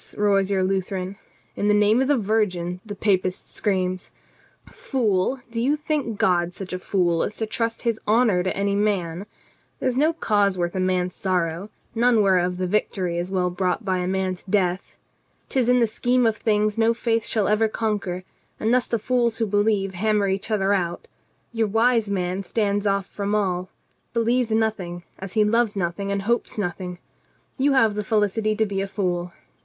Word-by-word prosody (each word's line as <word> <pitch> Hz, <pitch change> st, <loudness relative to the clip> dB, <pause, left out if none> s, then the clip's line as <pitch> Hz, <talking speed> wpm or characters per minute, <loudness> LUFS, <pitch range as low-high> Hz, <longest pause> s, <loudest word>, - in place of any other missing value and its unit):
roars 200 Hz, -2 st, +2 dB
your 195 Hz, -2 st, +1 dB
Lu 190 Hz, +1 st, +1 dB
theran. 185 Hz, +1 st, -5 dB, 0.4 s
'In 205 Hz, -, -1 dB
the 210 Hz, -, +4 dB
name 210 Hz, +4 st, +4 dB
of 265 Hz, -, +1 dB
the 290 Hz, -1 st, +3 dB
Virgin 190 Hz, -5 st, 0 dB
!' -, -, -39 dB
the 205 Hz, -, -5 dB
Papist 185 Hz, -3 st, 0 dB
screams. 185 Hz, -2 st, -2 dB, 0.6 s
Fool, 255 Hz, -, -1 dB
do 230 Hz, 0 st, -2 dB
you 275 Hz, +5 st, +2 dB
think 295 Hz, -7 st, -2 dB
God 175 Hz, -2 st, +2 dB
such 190 Hz, -2 st, -6 dB
a 185 Hz, -, -3 dB
fool 175 Hz, -3 st, +1 dB
as 210 Hz, -, -3 dB
to 220 Hz, -, -1 dB
trust 230 Hz, +1 st, -3 dB
His 230 Hz, -2 st, 0 dB
honor 215 Hz, -4 st, +3 dB
to 185 Hz, +1 st, -2 dB
any 200 Hz, 0 st, +1 dB
man? 200 Hz, -3 st, -1 dB, 0.5 s
There -, -, -1 dB
is 255 Hz, -, 0 dB
no 305 Hz, +4 st, +4 dB
cause 205 Hz, -, +1 dB
worth 175 Hz, -1 st, -1 dB
a 185 Hz, -, -2 dB
man's 185 Hz, -1 st, 0 dB
sorrow, 180 Hz, 0 st, -1 dB, 0.2 s
none 235 Hz, -1 st, +3 dB
whereof 180 Hz, -2 st, +2 dB
the 185 Hz, -, -1 dB
victory 180 Hz, -3 st, -1 dB
is. 175 Hz, +1 st, -3 dB
well 180 Hz, -2 st, 0 dB
bought 185 Hz, +4 st, -1 dB
by 185 Hz, -2 st, 0 dB
a 180 Hz, -, -2 dB
man's 190 Hz, -1 st, -1 dB
death. 190 Hz, -2 st, -1 dB, 0.5 s
'Tis 250 Hz, -3 st, +1 dB
in 250 Hz, 0 st, +5 dB
the 235 Hz, -, +4 dB
scheme 245 Hz, +3 st, +1 dB
of 225 Hz, -1 st, +2 dB
things 215 Hz, -1 st, 0 dB
no 230 Hz, +1 st, +3 dB
faith 230 Hz, -1 st, 0 dB
shall 215 Hz, -3 st, +1 dB
ever 215 Hz, +1 st, +3 dB
conquer, 205 Hz, -5 st, -2 dB, 0.4 s
and 220 Hz, +2 st, +1 dB
thus 250 Hz, 0 st, +3 dB
the 230 Hz, -, 0 dB
fools 235 Hz, 0 st, +1 dB
who 225 Hz, -, +1 dB
believe 205 Hz, -1 st, +1 dB
hammer 210 Hz, +2 st, +1 dB
each 195 Hz, +3 st, -2 dB
other 200 Hz, -2 st, +2 dB
out. 175 Hz, -3 st, -2 dB, 0.5 s
Your 225 Hz, -1 st, +1 dB
wise 225 Hz, +1 st, +2 dB
man 185 Hz, -1 st, -1 dB
stands 205 Hz, +1 st, 0 dB
off 200 Hz, -1 st, +1 dB
from 200 Hz, +1 st, -3 dB
all, 185 Hz, -3 st, -1 dB, 0.5 s
believes 235 Hz, +1 st, +2 dB
nothing, 210 Hz, -6 st, -1 dB, 0.2 s
as 190 Hz, -1 st, -6 dB
he 215 Hz, -, +4 dB
loves 225 Hz, 0 st, +2 dB
nothing 195 Hz, +2 st, -2 dB
and 200 Hz, 0 st, -1 dB
hopes 235 Hz, +2 st, -1 dB
nothing. 180 Hz, -2 st, -3 dB, 0.6 s
You 280 Hz, +1 st, +3 dB
have 225 Hz, -5 st, +4 dB
the 210 Hz, 0 st, -3 dB
felicity 215 Hz, +1 st, +1 dB
to 220 Hz, 0 st, +2 dB
be 195 Hz, -2 st, -2 dB
a 195 Hz, -, -2 dB
fool. 180 Hz, -3 st, -2 dB
205 Hz, 190 wpm, -23 LUFS, 185-225 Hz, 0.6 s, in